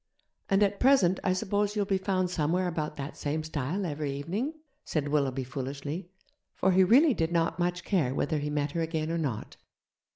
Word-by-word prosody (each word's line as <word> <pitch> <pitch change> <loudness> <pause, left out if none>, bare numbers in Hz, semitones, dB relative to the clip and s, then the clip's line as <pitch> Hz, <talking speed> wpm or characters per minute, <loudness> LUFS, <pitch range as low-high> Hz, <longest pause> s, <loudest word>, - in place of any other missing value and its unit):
'And 195 +1 +4
at 200 0 +1
present 230 -9 +4
I 185 - +2
suppose 205 +2 0
you'll 205 -1 +1
be 195 -1 +1
found 185 -2 0
somewhere 175 +3 +1
about 155 -3 -3
that 140 0 -6
same 155 +2 -2
stile 155 +5 -2
every 150 -3 -2
evening?' 190 - -3 0.3
said 145 -3 -2
Willoughby 135 -3 +1
foolishly, 140 +6 -5 0.5
for 190 - +2
he 185 +1 +5
really 265 - +6
did 165 -5 -1
not 170 0 +1
much 175 0 0
care 165 -11 +1
whether 155 -3 0
he 145 0 -3
met 145 -1 -1
her 165 - -2
again 160 -1 -2
or 170 - -1
not. 130 -9 -4
165 Hz, 190 wpm, -29 LUFS, 145-190 Hz, 0.5 s, really